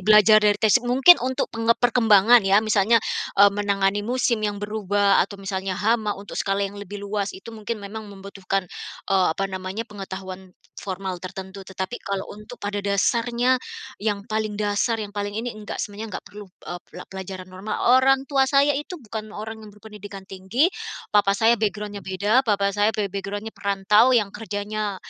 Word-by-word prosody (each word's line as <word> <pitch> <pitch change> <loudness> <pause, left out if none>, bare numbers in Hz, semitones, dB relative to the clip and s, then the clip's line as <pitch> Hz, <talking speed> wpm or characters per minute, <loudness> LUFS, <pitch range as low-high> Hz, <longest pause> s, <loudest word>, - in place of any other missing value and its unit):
belajar 215 +2 +6
dari 210 -1 +3
tesi 220 +3 +4
mungkin 255 +8 +6
untuk 260 +2 -2
peng 225 0 -3
perkembangan 235 -1 +5
ya 195 +1 +5
misalnya, 215 +1 +3 0.4
eee, 200 0 +8
menangani 200 0 0
musim 240 -1 0
yang 205 -1 -1
berubah, 205 -1 +2
atau 200 - -10
misalnya 195 -1 -3
hama 220 -1 +1
untuk 200 - -10
skala 195 0 0
yang 195 +1 -6
lebih 205 +1 -7
luas 200 0 -2
itu 190 +4 -12
mungkin 220 +1 -4
memang 210 +2 -7
membutuhkan, 195 -1 -4 0.4
eee, 190 -2 +3
apa 195 - -2
namanya 190 +4 -5
pengetahuan 190 -2 -8 0.2
formal 190 -1 -5
tertentu 190 +1 -8
tetapi 190 +5 -5
kalau 195 -1 -3
untuk 210 +4 -11
pada 205 0 -3
dasarnya, 235 +5 +2 0.4
yang 205 -1 -1
paling 215 -1 -1
dasar 210 +2 0
yang 205 -1 -6
paling 205 0 -3
ini 235 +2 -3
enggak 210 - -6
semuanya 215 +2 -5
enggak - - -10
perlu, 205 -1 -11 0.2
eee, 175 - -6
pola 180 - -10
pelajaran 190 -1 -7
normal. 190 +3 -5 0.2
Orang 270 0 +3
tua 270 -1 +2
saya 280 +1 +4
itu 295 +6 -5
bukan 220 -5 -7
orang 220 +1 -7
yang 215 - -11
berpendidikan 205 -1 -11
tinggi, 195 - 0 0.4
papa 200 -1 +3
saya 225 +3 +4
background-nya 210 -1 -2
beda 200 +6 +1
papa 200 -4 +1
saya 205 +1 +2
be 210 - 0
background-nya 205 +2 -5
perantau 200 +3 +3
yang 205 -4 0
kerjanya, 210 -1 -4
205 Hz, 170 wpm, -23 LUFS, 195-220 Hz, 0.4 s, eee